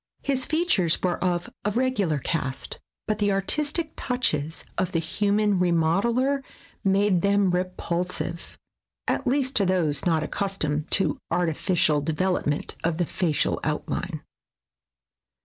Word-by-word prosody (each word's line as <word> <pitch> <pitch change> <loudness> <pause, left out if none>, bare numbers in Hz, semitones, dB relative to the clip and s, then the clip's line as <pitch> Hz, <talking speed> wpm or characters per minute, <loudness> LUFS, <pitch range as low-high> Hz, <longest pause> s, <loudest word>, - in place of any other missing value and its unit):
His 265 -2 0
features 310 - +2
were 180 0 0
of 175 -1 0 0.2
a 210 - +1
regular 210 - +1
cast, 130 -1 -3 0.3
but 215 -1 0
the 205 -1 +2
artistic 300 - 0
touches 160 - -1
of 185 +1 -1
the - - +2
human 205 +4 +1
remodeler 195 - +2 0.4
made 195 -2 +3
them 200 -1 +3
repul 180 -1 -1
sive, 170 -1 -5 0.5
at 275 - 0
least 265 0 +1
to 200 - +3
those 160 -6 +1
not 160 -3 +2
accustomed 155 -5 -2
to 190 - +1
artificial 160 -2 +1
development 155 -1 0
of 165 -1 0
the 175 - +1
facial 160 -2 0
outline. - - -3
185 Hz, 125 wpm, -25 LUFS, 165-210 Hz, 0.5 s, made